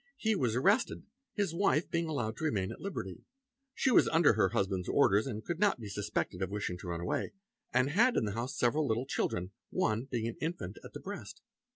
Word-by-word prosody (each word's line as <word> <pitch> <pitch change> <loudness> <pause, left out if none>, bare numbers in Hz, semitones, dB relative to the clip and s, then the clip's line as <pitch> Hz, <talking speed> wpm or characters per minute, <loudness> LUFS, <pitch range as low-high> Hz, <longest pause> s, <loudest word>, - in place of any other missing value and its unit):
He 220 -1 +1
was 120 - +1
arrested, 200 - +2 0.3
his 200 -6 0
wife 170 -3 +2
being 170 -1 0
allowed 120 -8 -2
to - - -6
remain 100 -11 0
at - - -9
liberty; 95 - -5 0.5
she 260 - +2
was - - +6
under 165 -6 +5
her 100 -3 +3
husband's 95 -1 -1
orders, 105 +6 +4 0.2
could 170 -1 -3
not 205 -9 +3
be 110 -3 -7
suspected 100 -2 -2
of 95 - 0
wishing 100 -3 -3
to - - -8
run 85 -1 -3
away, 90 - -2 0.4
and 130 +2 +2
had 235 +9 +4
in - - +2
the 105 - -2
house 120 +5 -4
several 145 +5 +2
little 115 +3 0
children, 90 -8 -2 0.2
one 110 +4 0
being 120 -4 -2
an 115 - -5
infant 155 - -4
at - - -11
the - - -6
breast. - - -8
120 Hz, 210 wpm, -32 LUFS, 100-165 Hz, 0.5 s, was